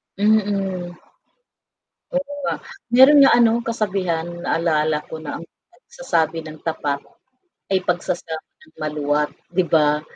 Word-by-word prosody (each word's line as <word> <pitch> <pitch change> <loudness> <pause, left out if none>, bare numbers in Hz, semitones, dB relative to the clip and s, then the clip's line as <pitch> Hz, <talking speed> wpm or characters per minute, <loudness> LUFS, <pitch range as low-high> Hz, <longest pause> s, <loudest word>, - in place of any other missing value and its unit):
Mm. 195 -4 0 1.2
Oo 280 +2 -2
nga, - - 0 0.4
meron 270 +4 +8
nga - - +7
ano 230 -2 +5 0.2
kasabihan 185 -7 -1 0.2
naalala 155 -2 +1
ko - - -6
na, 155 - -6
"Ang - - -10 0.3
pagsasabi 165 - -2
ng 155 0 -10
tapat, 145 -3 -2 0.7
ay 190 - +3
pagsasabi 175 -2 -2
ng 315 0 -21
maluwat." 150 -1 0 0.2
'di 185 - +3
ba? 150 -1 +3
175 Hz, 120 wpm, -21 LUFS, 155-215 Hz, 1.2 s, meron